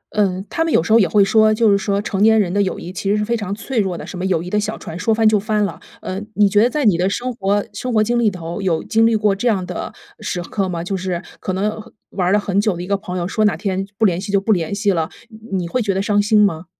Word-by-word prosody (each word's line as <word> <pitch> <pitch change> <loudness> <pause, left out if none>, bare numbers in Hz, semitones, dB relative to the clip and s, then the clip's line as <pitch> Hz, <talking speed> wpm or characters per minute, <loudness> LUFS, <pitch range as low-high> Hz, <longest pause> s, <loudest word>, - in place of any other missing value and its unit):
嗯， 195 -2 0
他 325 - 0
们 325 - -1
有 - - +4
时 215 - +1
候 230 - +7
也 195 - +4
会 205 -1 +4
说 215 +1 +4
就 215 0 +3
是 200 - +4
说 200 0 -1
成 200 -1 -3
年 220 +1 +5
人 185 -4 0
的 205 - +2
友 190 - -1
谊 180 - -8
其 195 +1 -3
实 205 - +2
是 210 - -1
非 235 +2 0
常 205 -4 -3
脆 235 +3 -3
弱 190 -4 -1
的， - - -7
什 185 - -8
么 - - -3
友 175 -4 0
谊 180 - -6
的 210 - +1
小 215 +1 -3
船 165 - -8
说 225 - 0
翻 220 0 +3
就 215 -1 +4
翻 210 +1 0
了。 - - -6 0.2
呃， 185 +1 -4
你 205 -1 +5
觉 205 +1 +3
得 240 - +4
在 295 +1 -1
你 200 -6 +4
的 185 - +2
生 245 +5 -3
活 205 -2 0
生 250 +4 -4
活 215 -2 +3
经 240 +2 0
历 235 - +2
里 - - +5
头， 175 +1 -6
有 175 -4 0
经 225 0 +3
历 230 - +2
过 210 -2 +2
这 200 +5 -2
样 195 -6 +1
的 180 -1 -5 0.3
时 180 - -3
刻 195 +1 -2
吗？ 170 -2 -3
就 195 +3 -3
是 180 -2 -3 0.2
可 185 - -3
能 210 +3 -2
和 230 - -16 0.2
玩 180 -2 0
了 205 - +4
很 200 -1 0
久 210 -4 0
的 175 - -5
一 180 - -7
个 200 - +1
朋 185 -2 -5
友， 175 -1 -2
说 215 +3 0
哪 200 -6 +2
天 195 +1 -2
不 220 - +3
联 180 -3 +1
系 200 - -5
就 200 - +3
不 200 +3 -1
联 175 -3 0
系 205 0 +1
了， 165 -3 -1 0.2
你 220 -3 -6
你 - - -4
会 250 +9 -1
觉 200 -4 -1
得 190 - 0
伤 205 0 +2
心 210 +1 +3
吗？ 165 -3 -2
200 Hz, 345 characters per minute, -19 LUFS, 185-215 Hz, 0.3 s, 候